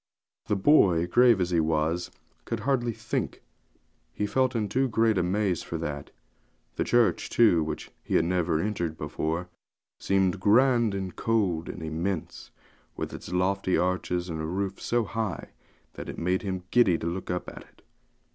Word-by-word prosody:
The 105 - +1
boy, 95 - +4
grave 120 +4 +5
as 90 -1 0
he 85 - +3
was, 80 +2 0 0.4
could 115 -2 -3
hardly 120 -1 +1
think; - - -4 0.7
he 105 - -2
felt 130 +3 +1
in 110 -2 0
too 130 +5 +1
great 110 -1 +2
a 90 - +2
maze 95 0 0
for 85 - -5
that. 75 -3 -5 0.7
The - - 0
church, 120 -2 +2
too, 105 -9 +4
which 80 - -5
he - - -2
had 80 - +4
never 85 -2 +1
entered 85 -4 -2
before, 80 +3 -3 0.5
seemed 95 -1 +1
grand 115 +1 +4
and 95 -2 -4
cold 95 -8 0
and 85 - -7
immense, 80 +3 -4 0.5
with - - -4
its - - -8
lofty 95 +1 +1
arches, 90 -1 -1
and 80 -2 -4
a - - -3
roof 95 +2 -3
so 120 0 +1
high 110 -2 -4 0.4
that - - -8
it - - -7
made 90 +2 0
him 95 -2 -4
giddy 100 -9 +4
to - - -6
look 85 +2 -4
up 90 0 -2
to - - -10
it. - - -15
95 Hz, 170 wpm, -27 LUFS, 85-110 Hz, 0.7 s, grave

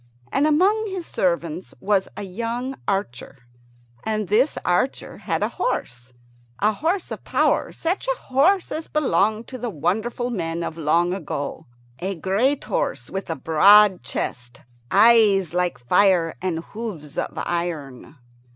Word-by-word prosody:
And 280 +3 +2
among 395 +8 +3
his 375 -3 -5
servants 170 - -2
was 195 -1 +1
a - - -4
young 235 +7 -4
archer, 140 - -3 0.7
and 215 -3 -2
this 245 +8 +2
archer 180 +10 -1
had - - -2
a - - +2
horse 125 - -3 0.5
a 210 +2 +2
horse 335 - -1
of - - -6
power - - +1
such 350 +8 -2
a - - 0
horse 335 +9 +2
as 315 +1 -4
belonged 220 -7 +1
to 255 - -7
the 240 0 -3
wonderful 220 - -2
men 170 -5 -3
of 160 - -4
long 170 +3 +1
ago 155 -4 -5 0.3
a 190 +2 -3
great 210 - +1
horse - - -2
with 195 -1 -5
a 165 - -1
broad 190 +7 +5
chest, 120 0 -5 0.3
eyes 205 -5 +5
like 180 -1 0
fire, 170 +6 +3
and 170 -3 -2
hoofs 200 -10 -6
of - - -3
iron. 160 -6 -4
195 Hz, 140 wpm, -23 LUFS, 165-245 Hz, 0.7 s, broad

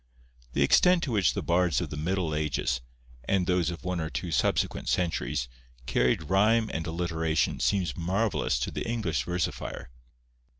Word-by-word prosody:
The 70 - +3
extent 180 - +5
to 135 - -2
which 100 -7 +2
the - - -2
bards 85 -2 +2
of - - -4
the - - -4
middle 85 +1 -1
ages, 75 -4 -1 0.4
and 95 +2 +1
those 90 -3 +1
of 85 - -7
one 90 -1 -2
or 80 -1 -2
two 85 +1 -4
subsequent - - 0
centuries, 85 -8 0 0.4
carried 60 +4 +1
rhyme 105 +6 +3
and 80 +1 -3
alliteration 80 -2 0
seems 95 -4 +1
marvellous 95 - 0
to - - -2
the - - -4
English 85 - -1
versifier. 90 -7 -3
85 Hz, 160 wpm, -28 LUFS, 80-95 Hz, 0.4 s, extent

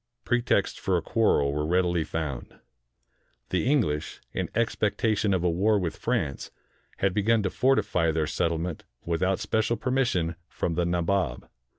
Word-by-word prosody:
Pretexts 120 0 +1
for 95 -2 +1
a - - -1
quarrel 75 -12 +2
were 75 +1 -1
readily 85 0 +1
found. 75 -6 -5 1.0
The - - +1
English, 85 - 0
in - - -2
expectation 110 -2 +1
of 95 -2 +1
a 90 - +3
war 105 +6 +2
with 85 -5 -2
France, 70 - -2 0.5
had 95 -1 +1
begun 110 +2 +2
to 95 - -1
fortify 105 -10 +2
their 80 -1 +1
settlement 85 +1 -2 0.2
without 90 +3 0
special 110 +1 0
permission 110 -9 0
from 85 - -2
the 85 +1 0
Nabob. 85 -5 0
90 Hz, 145 wpm, -27 LUFS, 80-110 Hz, 1.0 s, a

